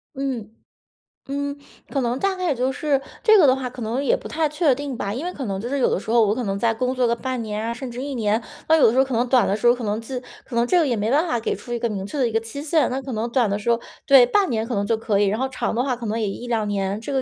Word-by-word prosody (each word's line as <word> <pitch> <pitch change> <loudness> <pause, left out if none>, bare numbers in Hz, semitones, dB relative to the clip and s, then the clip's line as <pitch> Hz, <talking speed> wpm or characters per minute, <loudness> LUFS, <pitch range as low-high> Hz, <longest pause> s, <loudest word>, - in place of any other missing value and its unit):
嗯， 255 -6 -3 0.8
嗯， 285 +1 -3 0.3
可 275 - -1
能 240 +1 0
大 390 +3 0
概 365 -1 -3
也 295 -6 +1
就 255 +2 0
是 285 -1 0 0.2
这 435 -2 +7
个 335 - +6
的 260 -1 +5
话 260 -2 -4
可 245 -1 -8
能 240 +6 -1
也 - - +2
不 - - -9
太 310 -1 0
确 300 -2 +2
定 275 -1 -5
吧， 200 -1 -3
因 265 +7 -4
为 360 - -3
可 270 -7 -6
能 195 -1 -3
就 240 - -4
是 280 - -1
有 260 - +3
的 - - 0
时 220 - -10
候 230 -1 +5
我 205 - +2
可 250 +1 -3
能 195 0 -1
在 225 +2 +1
工 255 +3 -1
作 250 -1 +2
个 235 0 +2
半 255 0 -3
年 215 0 -4
啊 230 - -2
甚 245 +1 -6
至 245 +2 -6
1 280 -1 -4
年， 220 0 +1 0.3
那 320 - +6
有 310 - +6
的 - - +4
时 250 - -2
候 265 - +5
可 260 - -5
能 245 +2 +1
短 245 -4 +4
的 200 - +1
时 240 - +1
候 240 - +6
可 245 - -7
能 210 +1 -1
自 250 +2 -5 0.2
可 240 - -8
能 235 +1 +3
这 355 +8 +3
个 310 - +2
也 240 - +1
没 215 +3 -1
办 310 +5 +3
法 240 -7 0
给 - - -1
出 240 - -10
一 240 - 0
个 235 - -1
明 195 -2 -4
确 290 - -6
的 255 -3 +2
一 - - -3
个 225 - +2
期 225 +5 -7
限。 315 0 +2
那 260 +1 -2
可 265 - -6
能 225 +2 -2
短 245 -3 +3
的 200 +1 -1
时 210 - -3
候 235 0 +3 0.3
对， 270 -3 +8
半 390 +8 +2
年 225 -2 -1
可 240 - -4
能 200 -1 0
就 225 +1 +1
可 215 -2 0
以， 205 - +3
然 215 +4 0
后 265 - 0
长 260 - -2
的 245 - +1
话 260 -3 0
可 235 -2 -6
能 220 +2 -1
也 215 - 0
1-2 225 +1 -2
年， 200 0 -1
这 275 +5 -5
个 265 - +1
245 Hz, 360 characters per minute, -22 LUFS, 220-270 Hz, 0.8 s, 对